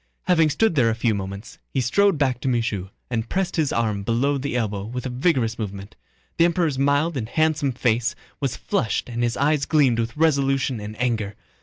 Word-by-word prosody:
Having 165 -4 +3
stood 195 +8 +2
there 125 -7 +3
a 110 - 0
few 115 -1 +1
moments, 100 +1 -6
he 135 - -1
strode 195 - +3
back 130 -4 0
to - - -3
Michaud 115 -6 -1 0.2
and 115 -1 -2
pressed 190 -1 -1
his 155 -4 +1
arm 110 -3 0
below 125 +7 +1
the 135 -2 -2
elbow 105 -4 -2
with 125 +4 -5
a - - -2
vigorous 125 -4 +1
movement. 100 -1 -6 0.4
The 165 - +5
Emperor's 165 -5 +1
mild 145 +4 +2
and 115 -4 -3
handsome 155 -2 +1
face 120 -2 0 0.2
was 135 -3 -1
flushed 115 0 -1
and 120 0 -3
his 120 -1 0
eyes 145 0 +2
gleamed 135 -7 +3
with 115 +4 -3
resolution 135 -5 +2
and 105 +2 -8
anger. 110 -5 -1
125 Hz, 195 wpm, -23 LUFS, 115-145 Hz, 0.4 s, The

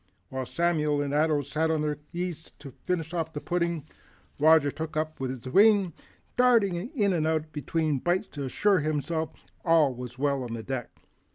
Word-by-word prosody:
While 130 -1 -4
Samuel 155 -4 +1
and 140 0 -3
Ato 150 -1 +2
sat 155 +4 -1
at 160 -1 +1
their 150 -1 -1
ease 175 -2 -5
to 140 -2 -10
finish 165 +3 -3
off 160 -2 -2
the 150 - -3
pudding, 170 -2 -1 0.5
Roger 155 -1 +5
took 160 +1 -6
his 155 - +3
upon 135 -5 -5
the 130 - -7
wing, 200 -1 +5 0.4
darting 235 -6 +4
in 205 - 0
and 160 -3 +1
out 160 -1 -1
between 150 0 -1
bites 175 +6 0
to 145 -2 -5
assure 195 +9 +2
himself 155 +1 -1
that - - -25 0.2
all 160 -5 +4
was 125 0 -8
well 140 0 +1
on 120 -2 -5
deck. 130 -2 -4
155 Hz, 180 wpm, -27 LUFS, 145-170 Hz, 0.5 s, Roger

